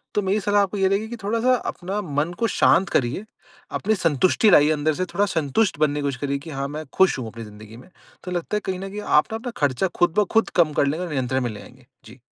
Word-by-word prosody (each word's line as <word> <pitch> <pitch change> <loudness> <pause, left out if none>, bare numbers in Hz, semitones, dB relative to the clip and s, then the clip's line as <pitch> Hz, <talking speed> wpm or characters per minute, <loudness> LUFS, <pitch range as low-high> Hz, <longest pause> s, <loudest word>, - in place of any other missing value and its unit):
तो 210 - +2
मेरी 195 +2 0
सलाह 205 0 +2
आपको 200 +1 -1
ये 195 -1 +3
रहेगी 200 +3 0
कि 240 - -6
थोड़ा-सा 230 +5 +2 0.2
अपना 195 +3 -5
मन 150 -2 -2
को 230 - +2
शांत 190 -2 +3
करिए। 135 - -1 0.5
अपनी 220 +2 0
संतुष्टि 175 - +2
लाइए 150 -4 +6
अंदर 155 0 +1
से 185 +5 -2
थोड़ा 205 - +2
संतुष्ट 170 +1 0
बनने 150 -1 +1
की - - -2
कोशिश 140 -3 -2
करिए 140 -1 -1
कि 155 +3 -11
हाँ 140 -1 -3
मैं 150 +2 -6
खुश 190 -5 +3
हूँ, 120 - -5
अपनी 115 +1 -8
ज़िंदगी 105 +1 -12
में। 125 - -15 0.3
तो 180 - -6
लगता 180 +4 -2
है 210 - -3
कहीं 185 -1 -3
न 195 +1 -6
कहीं 205 +2 -6
आप 150 -6 +3
ना 220 - -2
अपना 240 +2 -6
खर्चा 145 +5 +1
खुद 175 -2 +3
ब 210 - +3
खुद 225 - +2
कम 155 -2 +1
कर 140 - +2
लेंगे 160 +6 -2
और 170 - -7
नियंत्रण 130 -1 -1
में 120 - -1
ले 105 - -8
आएँगे। 125 0 -16 0.2
जी। 115 +4 -14
165 Hz, 265 wpm, -23 LUFS, 140-200 Hz, 0.5 s, लाइए